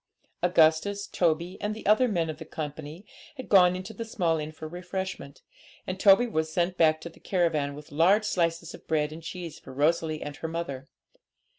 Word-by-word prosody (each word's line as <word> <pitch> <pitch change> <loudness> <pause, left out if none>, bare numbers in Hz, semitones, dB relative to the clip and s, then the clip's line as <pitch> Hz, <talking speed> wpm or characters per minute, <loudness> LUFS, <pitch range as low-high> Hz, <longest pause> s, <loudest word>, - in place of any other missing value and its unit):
Augustus, 180 +4 +3
Toby, 170 +1 0
and 210 +1 -2
the 220 - -10
other 215 +5 +4
men 175 -7 0
of 155 0 -6
the - - -6
company 155 +3 -7 0.3
had 260 - -7
gone 180 -3 +6
into 185 +4 -7
the 230 - -5
small 175 -7 0
inn 150 0 -5
for 155 0 -8
refreshment, 180 -3 -6 0.4
and 185 0 -4
Toby 200 +5 +6
was 160 -9 -2
sent 175 +2 0
back 155 -2 +4
to 170 - -7
the 165 - -19
caravan 155 -6 0
with 150 0 -12
large 185 +8 +4
slices 170 -4 -1
of - - -13
bread 150 -1 0
and 160 - -9
cheese 170 -1 -7
for - - -12
Rosalie 155 +3 0
and 145 0 -7
her 160 - -4
mother. 150 -5 -5
170 Hz, 190 wpm, -27 LUFS, 155-185 Hz, 0.4 s, gone